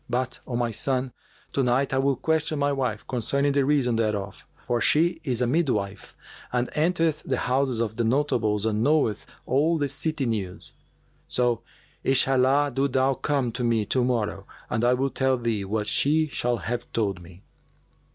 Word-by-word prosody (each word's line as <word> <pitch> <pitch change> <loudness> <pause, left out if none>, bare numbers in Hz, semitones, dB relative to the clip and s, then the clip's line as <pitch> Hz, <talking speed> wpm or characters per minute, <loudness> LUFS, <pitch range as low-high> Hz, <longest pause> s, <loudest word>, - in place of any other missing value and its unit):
But, 125 +1 -2
O 125 - -3
my 120 -1 0
son, 130 +3 -1 0.4
to 140 - +1
night 130 +2 +1
I 135 - +2
will 135 0 +2
question 155 +3 0
my 145 0 +1
wife 125 -6 -2
concerning 140 +3 +1
the 140 0 +2
reason 135 -5 +2
thereof, 105 -3 -2 0.2
for 120 -1 0
she 165 +2 +3
is 125 -3 0
a - - +3
midwife 120 -9 -1 0.3
and 125 0 -1
entereth 165 0 +1
the - - -2
houses 130 -1 0
of 110 -1 -2
the 120 - +1
notables 115 -5 +1
and 110 -1 0
knoweth 140 -6 +1 0.2
all 155 +6 +2
the 145 -2 0
city 155 0 -2
news. 100 -6 -3 0.5
So 120 -2 +1 0.4
Inshallah, 135 +2 +3
do 135 +2 +1
thou 135 0 +2
come 135 -3 -1
to 125 +2 -3
me 115 -3 +1
to 125 +5 +1
morrow 120 -4 -1 0.2
and 110 - 0
I 125 +1 +4
will 135 +1 -1
tell 130 -1 +1
thee 115 -4 -1
what 105 +2 -1
she 155 +7 +2
shall 120 -3 0
have 120 +1 -4
told 100 -5 -1
me." 90 +2 -15
125 Hz, 175 wpm, -25 LUFS, 115-140 Hz, 0.5 s, I